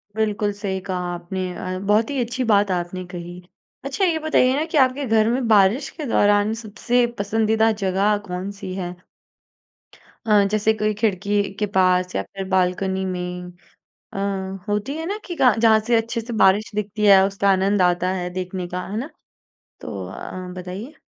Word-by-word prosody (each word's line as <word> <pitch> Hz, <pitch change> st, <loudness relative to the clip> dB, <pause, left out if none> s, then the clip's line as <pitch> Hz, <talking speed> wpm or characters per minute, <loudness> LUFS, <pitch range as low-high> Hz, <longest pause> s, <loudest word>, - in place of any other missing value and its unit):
बिल्कुल, 210 Hz, -1 st, 0 dB
सही 195 Hz, -2 st, -3 dB
कहा 180 Hz, -1 st, -2 dB
आपने 175 Hz, +2 st, -5 dB
अ, 185 Hz, 0 st, -4 dB
बहुत 220 Hz, +3 st, +3 dB
ही 280 Hz, -, -2 dB
अच्छी 250 Hz, +2 st, -3 dB
बात 200 Hz, -1 st, +3 dB
आपने 180 Hz, +1 st, -3 dB
कही। 175 Hz, 0 st, -7 dB, 0.5 s
अच्छा, 280 Hz, +8 st, -2 dB
ये 330 Hz, -3 st, +1 dB
बताइए 260 Hz, -4 st, +3 dB
ना 305 Hz, -, 0 dB
कि -, -, +3 dB
आपके 260 Hz, +2 st, -1 dB
घर 220 Hz, -1 st, +3 dB
में 245 Hz, -1 st, 0 dB
बारिश 210 Hz, +4 st, +4 dB
के 295 Hz, -, -3 dB
दौरान 205 Hz, +1 st, +3 dB
सबसे 240 Hz, +3 st, +1 dB, 0.2 s
पसंदीदा 220 Hz, +2 st, +2 dB
जगह 200 Hz, +3 st, +2 dB
कौन-सी 185 Hz, +1 st, -5 dB
है? 180 Hz, -2 st, -4 dB, 1.3 s
अ, 210 Hz, -2 st, +5 dB
जैसे 215 Hz, +1 st, +2 dB
कोई 215 Hz, 0 st, 0 dB
खिड़की 205 Hz, -1 st, +1 dB, 0.2 s
के 210 Hz, -, +1 dB
पास 185 Hz, -1 st, +3 dB
या -, -, +1 dB
फिर 195 Hz, -1 st, -7 dB
बालकनी 190 Hz, +1 st, +1 dB
नई 180 Hz, -1 st, -4 dB, 0.7 s
अ, -, -, -7 dB, 0.5 s
होती 210 Hz, +7 st, -1 dB
है 320 Hz, -, -4 dB
ना 410 Hz, +3 st, -3 dB
कि 350 Hz, -, -5 dB
का 250 Hz, -2 st, +5 dB
जहाँ 220 Hz, -1 st, +5 dB
से 240 Hz, -, +3 dB
अच्छे 230 Hz, +1 st, -1 dB
से 235 Hz, +2 st, -7 dB
बारिश 200 Hz, +3 st, +4 dB
दिखती 210 Hz, 0 st, -2 dB
है, 195 Hz, -1 st, +8 dB
उसका 200 Hz, 0 st, -1 dB
आनंद 195 Hz, +1 st, +2 dB
आता 180 Hz, 0 st, +2 dB
है 180 Hz, -1 st, -3 dB
देखने 185 Hz, 0 st, -4 dB
का, 180 Hz, +1 st, -4 dB
है 205 Hz, -, -5 dB
ना? 275 Hz, +6 st, -5 dB, 0.7 s
तो -, -, -6 dB
अ, 185 Hz, 0 st, -7 dB
बताइए? 185 Hz, +10 st, -7 dB
205 Hz, 175 wpm, -22 LUFS, 185-225 Hz, 1.3 s, है